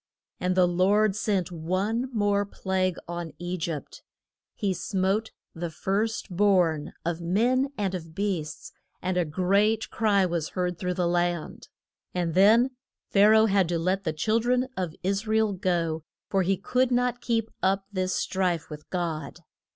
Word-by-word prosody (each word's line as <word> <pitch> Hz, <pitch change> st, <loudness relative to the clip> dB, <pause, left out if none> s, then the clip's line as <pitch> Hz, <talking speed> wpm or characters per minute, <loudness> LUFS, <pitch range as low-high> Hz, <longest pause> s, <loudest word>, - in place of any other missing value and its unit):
And 180 Hz, 0 st, 0 dB
the 180 Hz, -1 st, +6 dB
Lord 195 Hz, +4 st, +3 dB
sent 195 Hz, -4 st, 0 dB
one 190 Hz, +9 st, -1 dB
more 205 Hz, -3 st, +2 dB
plague 190 Hz, -2 st, -1 dB
on 170 Hz, -1 st, -5 dB
E 175 Hz, +1 st, -3 dB
gypt: 160 Hz, -4 st, -5 dB, 0.5 s
he 195 Hz, -2 st, 0 dB
smote 195 Hz, +4 st, 0 dB, 0.2 s
the 170 Hz, +1 st, -4 dB
first 200 Hz, +3 st, -2 dB
born 180 Hz, -6 st, +2 dB
of 170 Hz, 0 st, -2 dB
men 245 Hz, +10 st, +2 dB
and 195 Hz, -3 st, -1 dB
of 165 Hz, -3 st, -6 dB
beasts, 180 Hz, -6 st, -3 dB, 0.3 s
and 185 Hz, 0 st, 0 dB
a 180 Hz, -, +3 dB
great 200 Hz, +7 st, +1 dB
cry 205 Hz, -4 st, +3 dB
was 170 Hz, -3 st, -2 dB
heard 180 Hz, -1 st, -1 dB
through 180 Hz, -1 st, -2 dB
the 180 Hz, -1 st, +1 dB
land. 175 Hz, -1 st, -1 dB, 0.5 s
And 175 Hz, -2 st, 0 dB
then 225 Hz, +8 st, +5 dB, 0.4 s
Pha 200 Hz, +1 st, +6 dB
ra 220 Hz, 0 st, +7 dB
oh -, -, +5 dB
had 195 Hz, -5 st, +2 dB
to 170 Hz, -, +1 dB
let 185 Hz, +4 st, 0 dB
the 160 Hz, -, 0 dB
chil 215 Hz, +9 st, +1 dB
dren 250 Hz, +2 st, +1 dB
of 175 Hz, -4 st, -3 dB
Is 195 Hz, +3 st, -1 dB
ra 220 Hz, 0 st, +2 dB
el 220 Hz, -2 st, +2 dB
go, 170 Hz, -4 st, -1 dB, 0.3 s
for 195 Hz, -, +2 dB
he 190 Hz, +1 st, +1 dB
could 250 Hz, +6 st, +1 dB
not 245 Hz, 0 st, +1 dB
keep 225 Hz, -2 st, -1 dB
up 195 Hz, +1 st, +1 dB
this 185 Hz, -1 st, 0 dB
strife 180 Hz, -4 st, -1 dB
with 150 Hz, 0 st, -9 dB
God. 165 Hz, -3 st, -3 dB
185 Hz, 165 wpm, -27 LUFS, 175-210 Hz, 0.5 s, ra